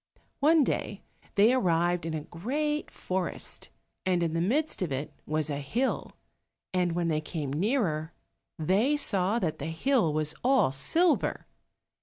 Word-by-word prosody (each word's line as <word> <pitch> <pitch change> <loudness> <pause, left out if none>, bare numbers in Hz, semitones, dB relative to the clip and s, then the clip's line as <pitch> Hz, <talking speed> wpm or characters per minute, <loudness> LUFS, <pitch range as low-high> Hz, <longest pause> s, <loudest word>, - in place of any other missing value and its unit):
One 310 +2 +5
day - - -2 0.3
they 215 +5 +5
arrived 175 -6 +1
in 160 - -2
a 155 - -4
great 290 - -2
forest, 185 0 -4 0.3
and 180 -2 +1
in 165 -1 -1
the 165 - 0
midst 280 - 0
of 175 -6 -1
it 135 +3 -3
was 155 0 0
a 145 -2 -2
hill, 230 - -1 0.6
and 180 -2 +1
when 170 0 0
they 155 -2 0
came 150 -3 -4
nearer 165 - 0 0.5
they 200 - +2
saw 200 -5 +1
that 170 -9 -1
the 145 - -4
hill 170 - +1
was 155 0 +1
all 255 - +4
silver. 320 - +2
175 Hz, 150 wpm, -28 LUFS, 155-250 Hz, 0.6 s, One